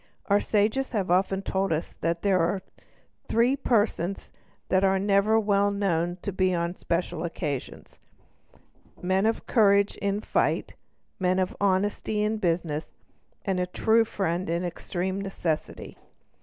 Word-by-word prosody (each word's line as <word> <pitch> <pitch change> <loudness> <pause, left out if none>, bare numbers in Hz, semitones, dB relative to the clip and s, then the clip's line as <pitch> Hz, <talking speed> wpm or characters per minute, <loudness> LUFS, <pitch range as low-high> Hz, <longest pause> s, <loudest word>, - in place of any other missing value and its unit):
Our 200 0 +3
sages 220 +7 0
have 195 -5 0
often 190 +1 +2
told 195 -1 -1
us 160 +1 -2
that 170 0 -1
there 195 -2 +3
are 185 +3 0 0.6
three 240 +4 +3
persons 205 -8 0 0.4
that 185 +1 +3
are 195 0 +3
never 200 +3 +3
well 205 -1 +2
known 175 -4 0
but 195 -2 -4
on 170 0 -1
special 170 -2 -2
occasions—men 175 - -5
of 225 - -1
courage 200 -3 +3
in 200 0 -1
fight, - - 0 0.5
men 185 0 +2
of 185 -1 0
honesty 205 +2 +1
in 215 +1 0
business, 165 -5 -2 0.5
and 190 -3 0
a 180 - 0
true 225 +5 +3
friend 185 -4 -2
in 170 +1 0
extreme 185 +2 -3
necessity. 175 -5 -4
195 Hz, 130 wpm, -26 LUFS, 175-205 Hz, 0.6 s, Our